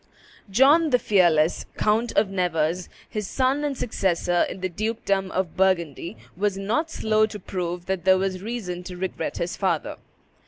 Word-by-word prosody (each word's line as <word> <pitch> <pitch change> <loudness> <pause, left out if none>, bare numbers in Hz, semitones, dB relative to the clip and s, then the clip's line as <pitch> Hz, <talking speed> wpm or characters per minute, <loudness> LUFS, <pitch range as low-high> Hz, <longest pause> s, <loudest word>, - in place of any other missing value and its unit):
John 285 - +5
the 250 - +4
Fearless, 175 -8 +3
Count 220 +3 +1
of 205 - +4
Nevers, 180 -2 -1 0.2
his 210 -2 -4
son 270 +2 +1
and 285 -3 -2
successor 175 -5 +1
in 190 - -7
the 185 - 0
dukedom 200 0 -1
of 185 -3 -2
Burgundy, 175 - 0 0.2
was 200 +1 0
not 225 +12 -1
slow 215 -7 +2
to 215 - -7
prove 180 -2 -4
that 190 -3 -2
there 190 0 +5
was 185 -1 -2
reason 200 -5 -4
to 180 -1 -7
regret 190 +1 -3
his 175 +4 -2
father. 180 -6 -1
190 Hz, 160 wpm, -24 LUFS, 180-220 Hz, 0.2 s, John